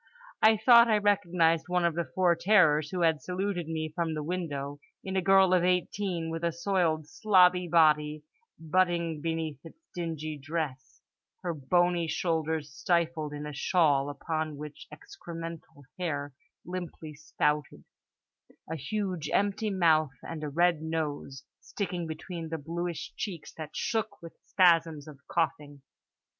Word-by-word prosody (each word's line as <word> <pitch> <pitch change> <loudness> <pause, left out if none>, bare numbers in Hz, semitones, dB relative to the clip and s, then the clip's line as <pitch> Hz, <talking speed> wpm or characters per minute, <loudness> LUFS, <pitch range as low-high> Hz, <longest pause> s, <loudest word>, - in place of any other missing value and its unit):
I 220 0 +6
thought 235 +2 +7
I 215 -2 +4
recognised 180 -5 +2
one 180 -1 +1
of 170 - +2
the 170 0 -3
four 180 -2 +4
terrors 165 -5 +4
who 180 +1 -3
had 160 -2 +2
saluted 180 -2 -3
me 160 -1 -3
from 165 -1 -2
the 150 - -3
window, 145 -5 -4 0.2
in 190 0 -4
a 190 - +2
girl 190 0 +5
of 180 -1 +4
18 180 -1 -1
with 165 +1 -5
a 170 - +1
soiled 170 -3 0
slobby 180 -1 +3
body 150 -2 +3 0.5
huddling 170 -4 +1
beneath 160 -3 -3
its 165 - -13 0.2
dingy 155 -3 -4
dress; 145 -3 -5 0.4
her 175 -2 -1
bony 175 +4 +1
shoulders 160 -3 -1
stifled 170 -2 0
in 150 0 -6
a 150 - -6
shawl 145 -1 +2
upon 155 +1 -3
which 150 0 -9
excremental 165 -1 -9 0.2
hair 145 -5 -3 0.3
limply 175 -3 -6
spouted; 150 -1 -2 0.8
a 160 - -4
huge 180 +1 -3
empty 205 +2 +1
mouth; 155 -7 +2
and 160 -2 -6
a 150 - -3
red 170 +1 +2
nose, 150 -4 -4 0.2
sticking 180 -4 -4
between 165 +1 -6
the 160 - -3
bluish 170 +2 -5
cheeks 175 -7 -6
that 155 -1 -9
shook 225 -2 -2
with 165 -1 -11
spasms 165 -5 +3
of 145 -3 -11
coughing. 145 -4 -2
165 Hz, 145 wpm, -29 LUFS, 150-180 Hz, 0.8 s, thought